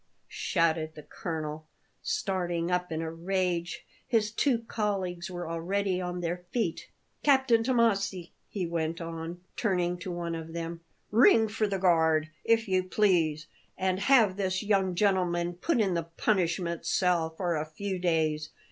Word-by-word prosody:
shouted 160 -1 0
the 150 - -10
colonel, 155 -1 -5 0.3
starting 175 -2 -1
up 180 -1 0
in 160 0 -2
a 160 - -3
rage; 175 0 -2 0.2
his 220 -3 +2
two 250 +2 +2
colleagues 190 -5 -2
were 175 -2 -5
already 185 +3 -1
on 180 0 -3
their 175 +1 -1
feet. 205 -8 -2 0.3
"Captain 265 -5 +4
Tommasi," 210 -8 +1 0.2
he 190 -4 -2
went 165 -1 -2
on, 165 +1 -6
turning 180 -5 0
to 180 +1 -5
one 170 -1 -3
of 165 0 -6
them, 165 0 -4 0.3
"ring 225 0 +6
for 215 0 0
the 200 -1 -1
guard, 160 -4 +3
if 230 0 +2
you 185 -1 +2
please, 175 -6 +2 0.3
and 185 0 0
have 215 -4 +4
this 190 0 -1
young 195 -3 +1
gentleman 175 -3 +1
put 245 - 0
in 200 -4 +2
the 170 - +1 0.2
punishment 175 -4 0
cell 175 -3 +2
for 175 -1 -1
a 150 - -1
few 185 +5 -4
days. 155 -3 0
180 Hz, 150 wpm, -29 LUFS, 165-200 Hz, 0.3 s, ring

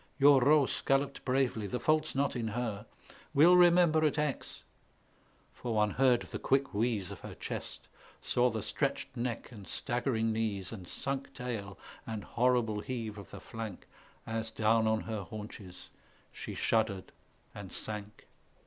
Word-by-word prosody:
Your 140 -1 +7
Roos 145 +2 +4
galloped 135 0 +1
bravely, 125 -5 +1
the 125 +6 -2
fault's 155 +2 +1
not 140 0 +1
in 115 -2 -2
her; 110 -2 -3 0.5
"We'll 165 +6 +8
remember 175 -3 +6
at 150 -1 +2
Aix" 150 -3 -2 0.9
for 120 -2 -4
one 105 -1 +3
heard 130 -2 +3
the - - -6
quick 135 0 +1
wheeze 105 -3 0
Of - - -8
her - - -9
chest, - - -6 0.3
saw 125 0 +2
the 110 -3 -3
stretched - - -2
neck 120 0 -3
and 105 -5 -11
staggering 120 -3 0
knees, 105 -4 -2
And 95 -6 -8
sunk 135 +6 -3
tail, 110 -6 -5 0.3
and 110 -2 -4
horrible 120 -3 +1
heave 110 -3 -4
of 100 - -11
the - - -9
flank, 110 -5 -7 0.4
As 115 0 -3
down 110 0 +2
on 110 0 +2
her 110 -2 -4
haunches 100 -1 -9 0.4
she - - -7
shuddered 105 -4 0 0.4
and 100 -2 -8
sank. 105 0 -5
115 Hz, 150 wpm, -32 LUFS, 105-135 Hz, 0.9 s, We'll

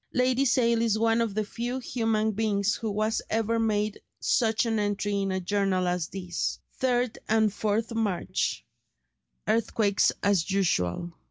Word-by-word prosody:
Lady 255 +2 +2
Sale 235 -2 +3
is 225 -2 +2
one 225 +1 +2
of 220 -4 -1
the 215 - +1
very 210 - -15
few 240 +2 -2
human 225 -4 0
beings 210 -1 +1
who 215 -2 -3
has 220 +1 0
ever 225 +1 0
made 215 -2 0 0.2
such 225 -1 +2
an 225 -2 0
entry 205 0 -1
in 195 -1 -1
a 190 - -1
journal 190 -1 0
as 180 -2 -1
this: 180 -2 -3 0.2
"3d 250 -2 +1
and 220 -1 +3
4th 215 +3 -1
March. 215 -6 -1 0.8
Earthquakes 215 -2 +2
as 200 -4 +2
usual." 170 - 0
215 Hz, 155 wpm, -27 LUFS, 200-230 Hz, 0.8 s, Sale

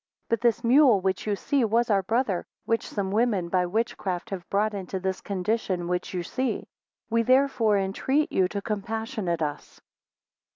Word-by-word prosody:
23 230 - +4
But 225 - -17
this 235 0 +2
mule, 250 -3 +6
which 190 +2 -2
you 205 - +1
see, 275 +6 0
was 230 +1 +2
our 200 -1 +4
brother, 215 -2 0 0.2
which 230 0 0
some 195 -2 -2
women 210 -5 +1
by 180 0 +1
witchcraft 210 -2 -2
have 185 -3 -6
brought 210 +2 +1
into 190 -1 -4
this 190 0 -2
condition 190 -2 -1
which 180 0 -2
you 180 -2 -3
see: 255 +8 -2 0.4
we 230 0 +3
therefore 250 -4 +3
entreat 260 +10 0
you 185 - +3
to 200 +1 -5
compassionate 215 -4 -2
us. 145 -1 -5
205 Hz, 170 wpm, -26 LUFS, 185-230 Hz, 0.4 s, mule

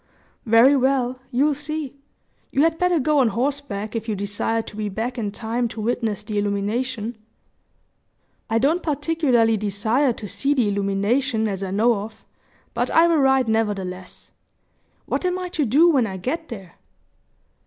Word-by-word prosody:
"Very 230 +5 +6
well 260 -1 +1
you'll 280 +4 +2
see. 295 0 -4 0.6
You 275 - +2
had 325 0 +1
better 360 -1 +2
go 295 +2 +2
on 255 - +4
horseback, 230 -2 -2
if 225 0 -3
you 215 - 0
desire 205 +3 -2
to - - -11
be 210 -1 -3
back 235 +5 -3
in 205 -3 -2
time 235 +3 -2
to 225 - -9
witness 220 -2 -1
the 210 0 -2
illumination." 215 +3 -2 1.3
"I 225 - +2
don't 295 +9 +2
particularly 285 -7 +1
desire 215 +7 +1
to 215 -2 -7
see 280 +8 0
the 245 -6 +2
illumination, 205 +5 0
as 195 -2 -3
I 195 - -3
know 220 +5 +3
of; 215 +2 -8 0.5
but - - -1
I 330 - +5
will 335 -1 +3
ride, 265 -3 +3
nevertheless. 195 -5 -3 0.7
What - - -2
am 365 0 0
I 365 -1 -4
to 320 -5 -1
do 285 +9 +5
when 260 -7 +2
I 190 -2 -5
get 315 - -4
there?" 195 -7 -9
235 Hz, 165 wpm, -22 LUFS, 210-280 Hz, 1.3 s, Very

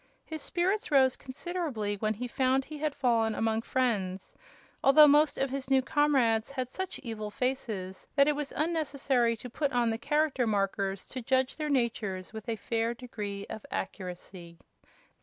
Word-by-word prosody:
His 315 -1 -6
spirits 385 +8 0
rose 265 -3 +4
considerably 265 - -3
when 215 +1 -1
he 250 +4 -4
found 260 +2 +1
he 305 -1 -8
had 300 -1 -1
fallen 230 -4 +2
among 225 0 0
friends, 205 -8 -1 0.5
although 300 +2 +8
most 295 +1 +4
of 270 -1 0
his 270 -1 -4
new 265 -1 +4
comrades 260 -6 +2
had 255 -3 -3
such 375 +7 -4
evil 220 -3 -4
faces 210 -6 -3
that 280 0 +5
it 300 - +3
was 295 -1 -3
unnecessary 280 -7 +1
to 250 - -8
put 280 +4 -1
on 240 -2 +2
the 225 - -3
Character 295 -2 +1
Markers 195 -2 -1
to 260 - -5
judge 260 +2 +1
their 305 -1 -3
natures 225 -8 -1
with 220 +1 -7
a 230 - 0
fair 230 +2 -1
degree 210 -5 -6
of 220 -1 -7
accuracy. 180 -2 -6
250 Hz, 165 wpm, -30 LUFS, 220-280 Hz, 0.5 s, although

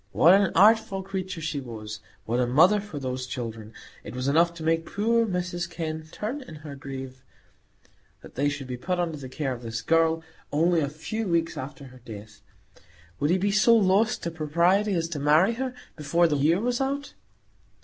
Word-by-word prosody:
What 170 +3 +6
an 195 -2 +4
artful 205 -2 +4
creature 190 -2 -5
she 155 -2 -2
was! 110 -4 -7 0.3
What 120 +2 0
a 125 - +2
mother 175 +12 +5
for 200 -7 -8
those 130 -2 -4
children! 115 -3 -6 0.3
It - - -8
was 125 +1 -2
enough 165 +4 +4
to 165 - -8
make 165 +1 +1
poor 230 +2 +2
Mrs 175 -2 -3
Kenn 160 -2 -5
turn 245 +8 -4
in 250 -11 -11
her 145 -2 -7
grave, 135 -2 -8 1.0
that - - -13
they 145 +3 +1
should 145 -1 -5
be 125 -1 -5
put 180 +8 -2
under 165 -3 -1
the 130 -2 -8
care 135 -1 -2
of 120 - -8
this 115 -1 -5
girl 165 +1 +2 0.3
only 165 +3 +3
a 140 - -1
few 210 +9 -4
weeks 165 -1 0
after 135 +1 -7
her 130 - -15
death. 105 -2 -11 0.8
Would 145 - +1
he 180 - +3
be 200 +2 0
so 215 +3 +5
lost 210 +1 +2
to 170 - -2
propriety 170 +6 +2
as 165 -1 0
to 160 -4 -4
marry 155 +9 +4
her 255 +1 -4 0.2
before 165 +3 +2
the 150 - 0
year 155 +5 +3
was 245 +3 -1
out? 280 +1 -2
165 Hz, 195 wpm, -26 LUFS, 135-190 Hz, 1.0 s, What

